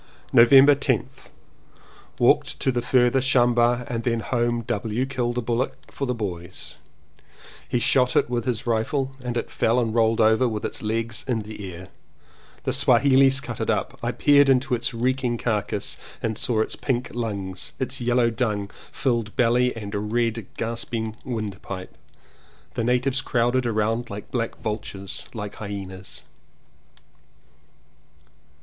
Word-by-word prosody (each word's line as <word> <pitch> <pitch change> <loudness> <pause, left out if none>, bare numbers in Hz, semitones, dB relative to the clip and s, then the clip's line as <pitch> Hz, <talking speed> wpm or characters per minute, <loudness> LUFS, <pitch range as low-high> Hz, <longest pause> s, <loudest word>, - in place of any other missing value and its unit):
November 135 +4 +8
10th. 130 -1 -2 0.9
Walked - - +3
to 135 - +1
the 120 -1 -1
further 125 +1 +3
shamba 120 -2 +3
and 115 -1 -3
then 115 -1 0
home. 120 -1 0
W. 120 +1 -1
killed 125 -3 -2
a - - +1
bullock 120 +2 -1 0.2
for 140 - -3
the 125 - -1
boys. 90 -5 -6 0.9
He - - +1
shot 125 +1 +2
it - - +4
with 120 -2 -2
his 120 -4 -2
rifle 130 +4 -1
and 120 -1 -2
it - - -3
fell 115 +2 +2
and 115 -3 0
rolled 115 -1 +2
over 110 +3 +4
with 110 -2 -3
its - - -4
legs 115 +2 -2
in 115 -4 -1
the 105 -3 -7
air. 90 +2 -10 0.7
The - - 0
Swahilees 135 +2 +4
cut - - -7
it - - -1
up. - - -1
I - - -1
peered 145 -1 +5
into 130 0 +2
its 120 - 0
reeking 125 0 0
carcass 110 -3 -2 0.2
and 110 -1 -2
saw 110 0 +1
its - - -2
pink 125 -3 -2
lungs, 100 -6 -4
its 130 -1 -3
yellow 120 -1 +2
dung 105 -4 -2 0.2
filled 120 -5 -1
belly 125 +1 +3
and 105 0 -4
red 115 -2 0
gasping 115 -1 -3
windpipe. 100 -6 -5 0.8
The - - -2
natives 125 +3 +1
crowded 120 -1 +1
round 115 +2 0
like 100 0 -8
black 115 -3 -2
vultures, 105 -3 -5
like 105 -2 -6
hyenas. 95 -2 -7
120 Hz, 145 wpm, -24 LUFS, 110-125 Hz, 0.9 s, November